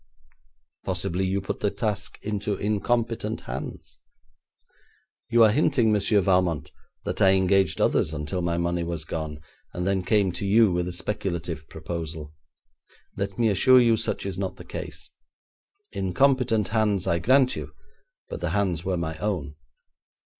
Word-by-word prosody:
'Possibly 95 +3 -1
you 95 +1 0
put 95 - -4
the 105 - +1
task 105 -2 -3
into 105 -1 -2
incompetent 110 +2 -1
hands?' - - -7 1.3
'You 115 0 +5
are 110 - +6
hinting, 120 -3 +3
Monsieur 105 0 +3
Valmont, 90 -4 +1 0.3
that - - -3
I 95 0 +6
engaged 95 0 +2
others 80 - +2
until 75 +4 -3
my 85 -1 -1
money 85 0 0
was 85 -2 -4
gone, 80 -2 -5 0.4
then 95 +2 0
came 100 -2 +2
to 95 - -5
you 110 0 +5
with 90 0 -1
a - - -3
speculative 85 -3 -4
proposal. 80 -3 -6 0.8
Let 100 0 -4
me 115 -2 +3
assure 125 +6 +6
you 115 -2 +4
such 110 -3 -2
is 95 -2 -4
not 95 -2 -3
the - - -12
case. - - -7 0.8
Incompetent 115 +2 +2
hands, 110 -4 +1
I 85 - +1
grant 130 +7 +4
you, - - -6 0.6
but - - -7
the - - -1
hands 95 -5 0
were 95 -1 -1
my 80 -1 -3
own. 90 -8 -2
95 Hz, 145 wpm, -25 LUFS, 85-110 Hz, 1.3 s, are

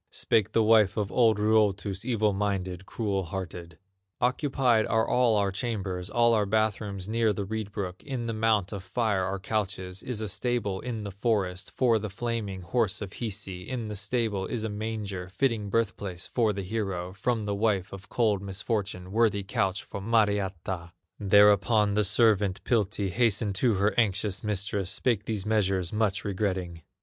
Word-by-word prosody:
Spake 110 -1 +1
the 115 - +4
wife 110 -2 +4
of 105 -3 -1
old 115 -4 +4
Ruotus, 105 -2 +1
Evil 110 -4 +1
minded, 95 -2 -2
cruel 100 -4 -2
hearted: 85 -3 -6 0.4
"Occupied 125 -3 +2
are 110 0 +2
all 125 -3 +3
our 100 -1 +1
chambers, 95 -4 -3
All 120 0 +3
our 105 -2 +2
bath 110 0 +1
rooms 100 -3 -5
near 115 0 +2
the 100 -1 -3
reed 110 0 -4
brook; 95 -3 -5
In 130 -4 -4
the 115 - -2
mount 110 -3 +1
of 100 -3 -5
fire 105 -2 0
are 95 +1 -2
couches, 95 -2 -3
Is 125 -4 -3
a 110 - -2
stable 105 -1 -1
in 115 -4 -4
the 100 - -5
forest, 100 -2 -1
For 120 -4 +2
the 105 0 -4
flaming 105 -2 -3
horse 105 +2 0
of 100 -2 -6
Hisi; 100 -5 -5
In 120 -4 -3
the 105 - -4
stable 105 -1 -1
is 115 -3 -3
a 110 - -2
manger, 105 -3 -4
Fitting 110 -1 0
birth 115 0 +1
place 90 -3 -6
for 115 -3 +1
the 100 -1 -4
hero 95 -3 -3
From 110 +3 -1
the 100 - -1
wife 100 -2 0
of 100 +1 -10
cold 110 -5 +1
misfortune, 100 -2 -3
Worthy 105 -2 +2
couch 100 -2 -1
for 100 - -7
Mariatta!" 95 -5 0 0.3
Thereupon 105 +1 +5
the 105 +1 +2
servant, 105 -2 +3
Piltti, 105 -4 0
Hastened 110 -2 +2
to 115 +3 +2
her 100 +2 +2
anxious 100 -3 +1
mistress, 100 -2 -1
Spake 115 -2 0
these 105 -4 -2
measures, 95 -4 +1
much 105 -3 0
regretting. 95 -4 -2
105 Hz, 175 wpm, -28 LUFS, 95-110 Hz, 0.4 s, Thereupon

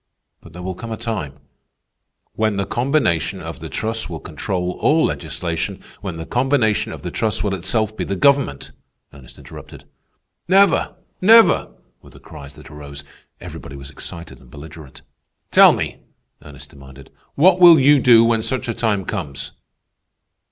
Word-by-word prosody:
But 85 - -16
there 90 +1 -9
will 95 +1 -4
come 115 +6 -9
a 110 - -4
time—" 90 - -5 1.0
"When 110 -1 -1
the 100 - -1
combination 120 - -1
of - - -8
the - - -8
trusts 110 -1 -3
will 80 -2 -6
control 90 +5 -4
all - - +3
legislation, 85 -2 -4 0.2
when 95 -5 -6
the 80 - -7
combination 125 - 0
of - - -10
the - - -5
trusts 110 -3 -1
will 100 -2 -1
itself 105 +4 -2
be - - -3
the 100 - -3
government," 135 - +1 0.4
Ernest 70 -3 -16
interrupted. - - -13 0.6
"Never! 195 +2 +3 0.3
never!" 225 +4 +5 0.3
were - - -17
the - - -17
cries 70 -3 -13
that - - -14
arose. 70 -1 -10 0.4
Everybody 70 - -10
was 70 0 -10
excited 85 +4 -10
and - - -19
belligerent. 75 -1 -13 0.5
"Tell - - +7
me," - - -4 0.4
Ernest 70 -1 -14
demanded, 70 -2 -15 0.2
"what 180 +5 +4
will 170 -3 +8
you 145 +2 +5
do 115 -2 +6
when 115 -1 +1
such 130 +3 -3
a 115 - -2
time 105 -5 -1
comes?" 70 -1 -5
95 Hz, 160 wpm, -19 LUFS, 75-120 Hz, 1.0 s, will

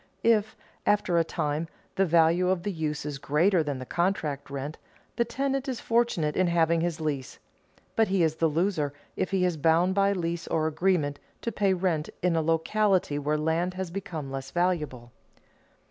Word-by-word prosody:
If, 220 -1 +3 0.3
after 190 -4 +2
a - - +4
time, 150 0 -2 0.3
the 195 0 +2
value 170 +2 +4
of 185 -2 0
the 205 - -1
use 155 -4 -3
is 145 -2 -4
greater 170 +6 +3
than 145 -3 -2
the 130 - -7
contract 155 -5 -1
rent, 140 +2 -5 0.4
the 235 - +1
tenant 270 +3 -2
is 255 - -3
fortunate 230 -11 +1
in 185 - +3
having 170 -1 +2
his 170 -1 -1
lease. 145 -5 -3 0.6
But 225 -1 +4
he 190 -2 +2
is 160 -1 +1
the 165 - +3
loser 160 -2 0 0.2
if - - -1
he 190 -2 +1
is 175 -3 0
bound 165 +4 +3
by 200 0 +3
lease 170 -2 -3
or 155 -1 0
agreement 160 -3 +1 0.2
to 230 - -2
pay 195 -3 +2
rent 175 -4 0
in 180 -2 +2
a 165 - +2
locality 165 0 +1
where 150 +1 0
land 165 +4 0
has 185 -2 -4
become 170 -7 -5
less 135 0 -5
valuable. 150 -9 -1
170 Hz, 180 wpm, -27 LUFS, 150-190 Hz, 0.6 s, a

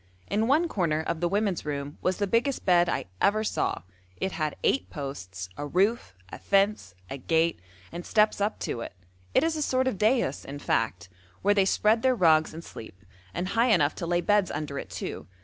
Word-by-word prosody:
In 215 +2 0
one 310 +6 +3
corner 165 - 0
of 160 - -2
the 175 - +1
women's 200 -1 0
room 145 -1 -5
was 185 0 0
the 205 - 0
biggest 235 +7 0
bed 175 -1 +4
I - - -1 0.2
ever 215 +2 +3
saw: - - -1 0.3
it 190 - -2
had 155 -3 -2
eight 270 - +1
posts, 95 - -6
a 145 - -4
roof, 190 - 0
a - - -9
fence, 195 - +1 0.2
a 135 - -4
gate, 165 +4 +1 0.3
and 175 +1 -6
steps 210 0 +2
up 210 +2 0
to 115 - -3
it; - - -7 0.4
it - - +5
is 325 0 +1
a 310 - -2
sort 260 -2 +1
of 205 -8 -2
daïs, 215 - +1
in 140 +1 -7
fact, 110 -6 -1 0.4
where 205 +1 +4
they 200 -2 +3
spread 215 +3 +2
their 260 0 +3
rugs 160 -6 +4
and 165 +1 -9
sleep, 110 - -11 0.3
and 180 - -3
high 230 +4 +2
enough 160 -10 +3
to 170 - -5
lay 175 0 +1
beds 205 0 +2
under 145 -2 -4
it - - -8
too. - - -6
185 Hz, 205 wpm, -27 LUFS, 150-215 Hz, 0.4 s, it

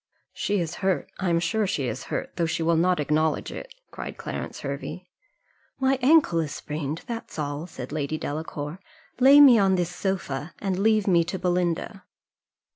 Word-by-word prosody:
"She 205 0 -1
is 165 -3 -3
hurt 190 -2 0
I 185 - 0
am 170 0 +3
sure 195 +5 0
she 140 -8 -1
is 115 - -4
hurt, - - -4
though 170 - 0
she 160 0 -1
will 165 +1 +3
not 180 +2 +2
acknowledge 155 +1 0
it," - - -9 0.2
cried - - -7
Clarence - - -6
Hervey. - - -5 0.7
"My 265 0 +2
ankle 275 - +5
is 155 -3 -2
sprained, 150 +1 -4
that's 230 -6 -6
all," 145 +2 -3
said 165 - -8
Lady 155 0 -2
Delacour 150 +2 -5 0.4
"lay 275 +3 +8
me 265 -6 +9
on 195 -1 +4
this 180 -1 -1
sofa, 170 -6 -3
and 190 -2 -2
leave 215 0 +3
me 175 -4 +4
to 190 - -3
Belinda." 180 +2 -1
175 Hz, 175 wpm, -25 LUFS, 155-200 Hz, 0.7 s, me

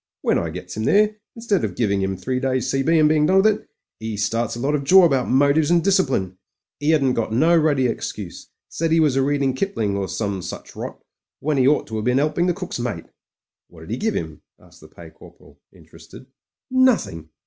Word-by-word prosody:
"When - - +2
I 85 - -3
gets 90 +2 -8
'im 110 +1 -3
there, 210 +1 +3 0.2
instead 225 -4 -1
of - - -3
giving 100 -4 0
'im 95 0 -2
three 125 +7 -2
days 130 -2 -1
C.B. 135 +5 +2
and 155 -1 +5
being 150 0 +3
done 190 +2 +4
with - - -1
it, 215 -1 +1 0.3
'e 110 -1 -5
starts 115 +3 -1
a - - -7
lot 140 +4 -1
of 145 -2 -1
jaw 185 +6 +7
about 135 -6 +1
motives 145 +3 +3
and 170 -1 +3
discipline. 130 - 0 0.4
*E 145 +1 -1
hadn't 140 -5 +3
got 115 -2 -2
no 160 +9 +3
ruddy 150 -5 +2
excuse; 105 -5 -5 0.2
said 165 0 -2
'e 165 - +4
was 150 -4 +3
a'reading 135 0 +1
Kipling, 130 - -2
or 100 -1 -2
some 100 -3 -3
such 90 - -9
rot - - -8 0.2
— - - -36
^when 150 -1 0
'e 130 - +4
ought 150 - +2
to 110 - -6
have 110 - -4
been 125 +1 +2
'elping 155 +5 +1
the 175 - 0
cook's 180 -8 -6
mate." 120 -9 -4 0.6
"What 80 - -16
did 80 - -10
he 120 - -2
give 220 +7 -1
him?" - - -5 0.2
asked - - -20
the - - -14
Pay - - -14
Corporal, - - -18
interested. - - -16 0.5
"Nothing. 160 - +1
135 Hz, 220 wpm, -21 LUFS, 110-165 Hz, 0.6 s, jaw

